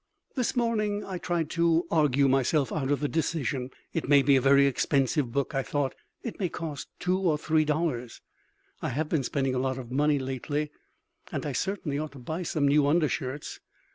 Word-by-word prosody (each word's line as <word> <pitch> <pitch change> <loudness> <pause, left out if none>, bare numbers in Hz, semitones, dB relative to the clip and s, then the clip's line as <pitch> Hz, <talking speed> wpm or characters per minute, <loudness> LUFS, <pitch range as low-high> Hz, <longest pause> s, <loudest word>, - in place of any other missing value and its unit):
This 250 -2 -1
morning 215 -4 0
I 185 -2 -5
tried 165 -2 -1
to 170 0 +2
argue 145 -3 +3
myself 135 +2 +2
out 135 -4 -1
of 145 0 +1
the 145 - +1
decision. 145 -5 -1 0.2
It - - -2
may 140 -1 +6
be 140 +1 +5
a 130 - +4
very 140 +1 +6
expensive 135 -1 +1
book, 140 +4 -1
I 135 - +1
thought; 140 0 -1 0.3
it 235 - -6
may 185 -4 0
cost 160 -5 -5
two 180 +1 0
or 170 -6 +2
three 155 +1 +2
dollars; 150 -6 -1 0.6
I - - -1
have 150 +4 -2
been 160 - +1
spending 135 -1 -1
a 130 - 0
lot 130 0 -1
of 125 -2 -8
money 145 +2 +3
lately, 140 +3 -3 0.6
and - - -3
I 145 - -1
certainly 160 -2 -2
ought 155 -1 -4
to - - -11
buy 160 +7 -4
some 155 -4 0
new 145 0 +4
undershirts. 145 -3 -1
145 Hz, 195 wpm, -28 LUFS, 135-165 Hz, 0.6 s, may